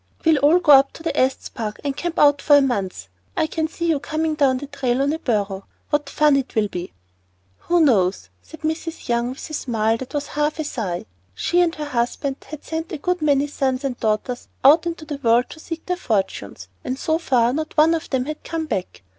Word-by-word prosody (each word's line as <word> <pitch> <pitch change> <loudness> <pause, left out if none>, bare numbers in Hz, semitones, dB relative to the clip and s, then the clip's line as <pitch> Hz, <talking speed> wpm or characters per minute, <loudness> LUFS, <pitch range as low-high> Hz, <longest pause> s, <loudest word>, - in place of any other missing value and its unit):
We'll 320 -3 +5
all 295 +5 +5
go 330 -4 +4
up 275 -1 +7
to 325 -3 -4
Estes 260 -2 +1
Park 215 -3 -5
and 280 -2 -2
camp 345 +2 -4
out 290 -1 +5
for 290 - +6
a - - +5
month. 200 - -2 0.3
I - - +3
can 315 0 -2
see 335 +1 -5
you 330 - +3
now - - -6
coming 315 +2 -1
down 275 -4 +2
the 280 - -6
trail 255 -3 -1
on 280 +2 +1
a 320 - -3
burro, 200 -6 -2 0.2
what 295 -1 0
fun 300 -1 +3
it 270 -1 -3
will 215 -2 +2
be." 180 -1 -6 0.8
"Who 350 0 +4
knows?" 200 - +2
said 320 - -14
Mrs. 320 +1 -4
Young, 235 0 +1
with 260 - -7
a 310 - -10
smile 225 -5 0
that 260 +4 -8
was 290 0 -2
half 295 +1 0
a 315 - -2
sigh. 205 -12 -4 0.3
She 350 +1 +2
and 340 -1 +1
her 300 - -4
husband 265 +1 -1
had 305 0 -8
sent 320 0 -4
a 320 - -3
good 360 +4 -1
many 285 -2 +3
sons 270 -2 -1
and 270 -3 -2
daughters 220 +3 -1 0.2
out 315 +5 +7
into 335 -2 -5
the 295 -2 -5
world 235 0 +3
to - - -10
seek 330 0 -7
their 360 -1 -1
fortunes, 190 - -2 0.2
and 255 - -3
so 320 +3 0
far 245 -6 +2
not 310 +2 -4
one 315 +2 +6
of 325 - -3
them 260 -2 0
had 305 +1 -6
come 325 -1 -3
back. 195 - -4
285 Hz, 230 wpm, -22 LUFS, 245-315 Hz, 0.8 s, up